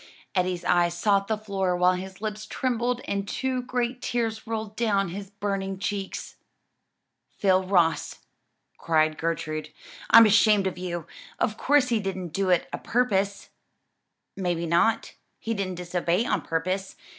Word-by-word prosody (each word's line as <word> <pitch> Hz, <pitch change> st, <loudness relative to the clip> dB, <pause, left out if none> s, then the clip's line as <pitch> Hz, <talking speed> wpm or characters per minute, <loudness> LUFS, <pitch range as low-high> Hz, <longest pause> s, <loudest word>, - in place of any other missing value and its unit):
Eddie's 180 Hz, -2 st, 0 dB
eyes 175 Hz, -1 st, +2 dB
sought 200 Hz, +1 st, +2 dB
the 220 Hz, -, 0 dB
floor 195 Hz, -4 st, -1 dB
while 180 Hz, +1 st, +4 dB
his 190 Hz, +1 st, -7 dB
lips 215 Hz, 0 st, -4 dB
trembled 245 Hz, 0 st, -1 dB
and 200 Hz, 0 st, -2 dB
two 260 Hz, +2 st, -1 dB
great 250 Hz, 0 st, -2 dB
tears 225 Hz, -2 st, -2 dB
rolled 220 Hz, -2 st, -4 dB
down 200 Hz, -5 st, +1 dB
his 195 Hz, +2 st, -7 dB
burning 195 Hz, -1 st, -3 dB
cheeks. 195 Hz, +1 st, -4 dB, 1.0 s
"Phil 190 Hz, -1 st, +3 dB
Ross," 175 Hz, -4 st, +1 dB, 0.5 s
cried 155 Hz, -1 st, +2 dB
Gertrude, 155 Hz, -1 st, -3 dB, 0.4 s
"I'm 230 Hz, 0 st, +9 dB
ashamed 210 Hz, -1 st, +5 dB
of 185 Hz, -1 st, -2 dB
you! 175 Hz, -3 st, -4 dB, 0.3 s
of 220 Hz, -, 0 dB
course 280 Hz, +2 st, +3 dB
he 230 Hz, -2 st, +2 dB
didn't 190 Hz, -3 st, -4 dB
do 195 Hz, +4 st, -1 dB
it 180 Hz, -2 st, +3 dB
a -, -, -3 dB
purpose." 200 Hz, -5 st, 0 dB, 0.9 s
"May 180 Hz, -2 st, -1 dB
be 170 Hz, +1 st, -3 dB
not; 175 Hz, +7 st, +2 dB, 0.2 s
he 230 Hz, -, -3 dB
didn't 195 Hz, -3 st, -3 dB
disobey 180 Hz, +3 st, 0 dB
on -, -, 0 dB
purpose? 185 Hz, +4 st, -2 dB
195 Hz, 145 wpm, -26 LUFS, 180-220 Hz, 1.0 s, I'm